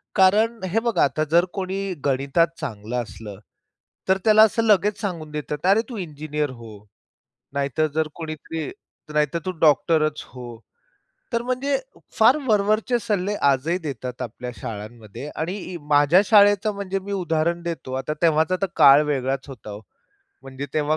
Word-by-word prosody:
कारण 215 +3 +3
हे 225 - +3
बघा 235 0 +1
आता 155 +2 +1
जर 170 +2 +5
कोणी 195 0 -3
गणितात 140 +4 +2
चांगलं 120 -4 -4
असलं 105 -3 -10 0.7
तर 190 - +4
त्याला 215 0 +7
असं 220 +1 +2
लगेच 210 -1 +3
सांगून 170 -7 -4
देतात, 150 0 -4
"अरे 200 +4 +5
तू 240 - -6
इंजिनियर 150 -4 -3
हो," 115 -3 -10 0.8
नाहीतर 140 +2 0
जर 160 0 0
कोणीतरी 160 0 -6 0.4
नाहीतर 150 +2 +1
"तू - - 0
डॉक्टरच 155 0 +3
हो." 125 -1 -11 0.9
तर 235 - +1
म्हणजे 255 +3 0 0.4
फार 235 +6 +6
वरवरचे 215 +3 +2
सल्ले 210 -3 -1
आजही 140 +6 +1
देतात 130 -5 -6
आपल्या 125 +1 -6
शाळांमध्ये. 110 +4 -8
आणि 170 +5 -3
इ 185 -2 -7
माझ्या 145 +5 +5
शाळेचं 205 0 +5
म्हणजे 195 -1 -3
मी 195 +1 -8
उदाहरण 170 -2 0
देतो. 165 -6 -5
आता 135 +3 -2
तेव्हाचा 160 +1 +3
तर 195 - +1
काळ 140 +2 +7
वेगळाच 135 -1 -1
होता 125 -5 -10
हो. 105 +1 -8 0.6
म्हणजे 135 +1 -7
तेव्हा 155 0 +1
160 Hz, 150 wpm, -23 LUFS, 140-200 Hz, 0.9 s, त्याला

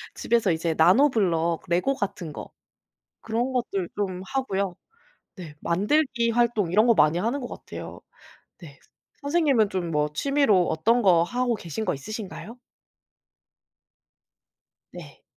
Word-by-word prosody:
집에서 230 -5 +1
이제 165 0 -1
나노블록, 175 - +3
레고 180 +11 +1
같은 190 - -4
거 - - -9 0.7
그런 235 +3 -2
것들 195 -7 -2
좀 185 -3 -3
하고요. 200 -9 -1 0.6
네 170 -6 -10
만들기 235 - +1
활동 225 -6 +1
이런 215 +5 +4
거 235 - +5
많이 155 +1 +3
하는 235 +9 -1
것 245 - -6
같아요. - - -9 0.6
네. 145 -7 -13 0.4
선생님은 285 -8 +2
좀 180 -4 -3
뭐 150 -1 0
취미로 225 - +2
어떤 230 +10 +2
거 175 -5 +4
하고 245 +5 -1
계신 175 +1 -6
거 185 - 0
있으신가요? 215 - -8 2.3
네. - - -12
205 Hz, 245 characters per minute, -25 LUFS, 170-240 Hz, 2.3 s, 거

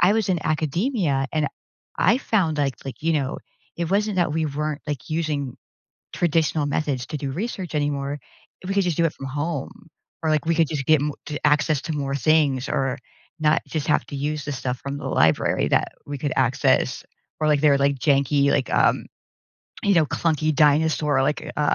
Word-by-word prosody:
I 180 +3 +5
was 220 -3 0
in 175 -3 +1
academia, 155 - 0
and 155 -2 +1 0.5
I 230 +7 +4
found, 180 - 0
like 140 -2 0
like, 135 +2 -8
you 165 0 +2
know, 140 -2 -1 0.4
it 170 - -1
wasn't 205 0 +1
that 175 -4 +2
we 160 +1 0
weren't, 150 +1 -3
like, 140 -7 -4
using 150 -5 -2 0.6
traditional 160 -2 +1
methods 145 -3 -1
to 155 - -4
do 140 -1 -3
research 185 - -4
anymore, 145 -1 -1 0.5
we 195 - -2
could 200 -2 +2
just 175 -4 -1
do 170 - +3
it 150 - -2
from 135 - -8
home. 160 +8 -4 0.3
Or, 160 - +1
like, 155 0 +1
we 165 - +2
could 165 -2 +3
just 145 -4 -3
get 155 -2 +5
m 150 0 -1
t 150 - -4
access 150 0 +3
to 160 - -4
more 140 -2 -2
things 140 -1 +2
or 135 0 0 0.4
not 150 0 +3
just 155 -3 -3
have - - +2
to 140 - -7
use 150 +1 -2
the 145 - -3
stuff 125 -1 -3
from 140 +1 -5
the - - -9
library 80 +1 +2
that - - +1
we 145 0 -4
could 145 -1 -2
access. 130 0 +2 0.4
Or, 155 - +2
like, 145 -2 +3
their, 150 -2 +5
like, 140 0 +2
janky, 140 +1 +3
like, - - 0
um, - - +3 0.8
you 200 - +4
know, 165 -3 +5
clunky 155 -1 0
dinosaur, 150 -2 +3
like, 150 +2 -1
uh, - - -1
150 Hz, 195 wpm, -23 LUFS, 140-160 Hz, 0.8 s, I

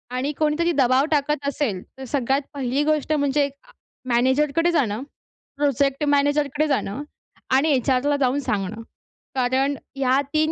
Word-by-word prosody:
आणि 270 +4 -1
कोणीतरी 315 +3 +1
दबाव 265 -2 +3
टाकत 290 -1 0
असेल, 250 -10 -1 0.2
तर 265 - -8
सगळ्यात 270 +1 0
पहिली 275 +1 -1
गोष्ट 305 0 +1
म्हणजे 285 -1 +2
अ, 280 - -18 0.4
मॅनेजरकडे 280 +7 +2
जाणं. 245 -6 0 0.5
प्रोजेक्ट 280 0 +1
मॅनेजरकडे 290 +1 +2
जाणं 275 -1 -1 0.5
आणि 280 +4 +3
एचआरला 270 +2 +2
जाऊन 270 0 +1
सांगणं. 210 -4 -3 0.5
कारण 260 +2 +1 0.2
ह्या 265 0 +2
3 310 0 +2
280 Hz, 130 wpm, -23 LUFS, 260-295 Hz, 0.5 s, दबाव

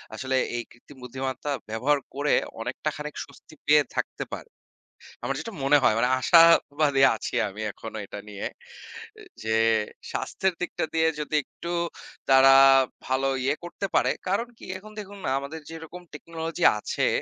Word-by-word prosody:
আসলে 130 +3 -2 0.2
এই 120 - -2
কৃত্রিম 130 +3 -17
বুদ্ধিমত্ত্বা 130 +3 -4 0.2
ব্যবহার 135 +7 +1 0.2
করে 145 +1 +1 0.3
অনেকটা 125 +6 -3
খানিক, 150 0 -7
স্বস্তি 140 +2 -18
পেয়ে 150 0 +6
থাকতে - - -3
পারি। - - -7 0.7
আমার 135 +3 -1
যেটা 230 - -7
মনে 140 +2 +5
হয়, - - +5
মানে 125 - +2
আশাবাদী 150 -2 +5
আছি 110 - -6
আমি, 105 +2 -8
এখনো 110 +1 -8
এটা 100 - -8
নিয়ে। 100 -1 -6 0.7
এ - - -12 0.2
যে, 110 0 0 0.6
স্বাস্থ্যের 190 -1 -1
দিকটা 180 - -2
দিয়ে 160 0 +3
যদি 150 +1 -3
একটু 170 +5 -8 0.6
তারা 135 0 +7 0.6
ভালো 130 +1 +1 0.2
ইয়ে 140 +3 +1
করতে 175 +3 -5
পারে, - - +3 0.2
কারণ 200 +6 0
কি? - - -12
এখন 210 +3 -13
দেখুন 200 0 -9
না? - - 0
আমাদের 145 +4 -7
যেরকম 165 +2 -9
টেকনোলজি 165 +2 -5 0.2
আছে, - - -1
145 Hz, 155 wpm, -26 LUFS, 130-165 Hz, 0.7 s, তারা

